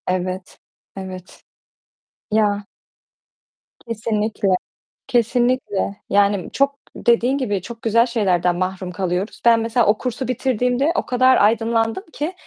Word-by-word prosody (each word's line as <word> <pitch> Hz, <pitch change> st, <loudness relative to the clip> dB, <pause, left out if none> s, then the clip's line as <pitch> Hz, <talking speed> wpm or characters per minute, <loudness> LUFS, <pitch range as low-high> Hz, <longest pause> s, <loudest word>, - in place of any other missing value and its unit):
Evet, 185 Hz, 0 st, -3 dB, 0.4 s
evet. 185 Hz, -1 st, -9 dB, 0.9 s
Ya. 205 Hz, -1 st, +1 dB, 1.2 s
Kesinlikle, 220 Hz, -2 st, -1 dB, 0.6 s
kesinlikle. 240 Hz, -4 st, +1 dB
Yani 200 Hz, -1 st, +2 dB
çok 280 Hz, 0 st, +1 dB, 0.2 s
dediğin 240 Hz, +3 st, +2 dB
gibi 205 Hz, -8 st, -1 dB
çok 230 Hz, +3 st, -9 dB
güzel 230 Hz, +1 st, +3 dB
şeylerden 185 Hz, -7 st, +1 dB
mahrum 185 Hz, 0 st, -3 dB
kalıyoruz. 185 Hz, +2 st, -3 dB
Ben 230 Hz, -1 st, +6 dB
mesela 230 Hz, +1 st, +1 dB
o 210 Hz, +1 st, +3 dB
kursu 250 Hz, 0 st, -3 dB
bitirdiğimde 255 Hz, +3 st, +1 dB
o -, -, -1 dB
kadar 255 Hz, +1 st, +4 dB
aydınlandım 225 Hz, -, +2 dB
ki, 305 Hz, +5 st, -3 dB
225 Hz, 110 wpm, -20 LUFS, 195-245 Hz, 1.2 s, Ben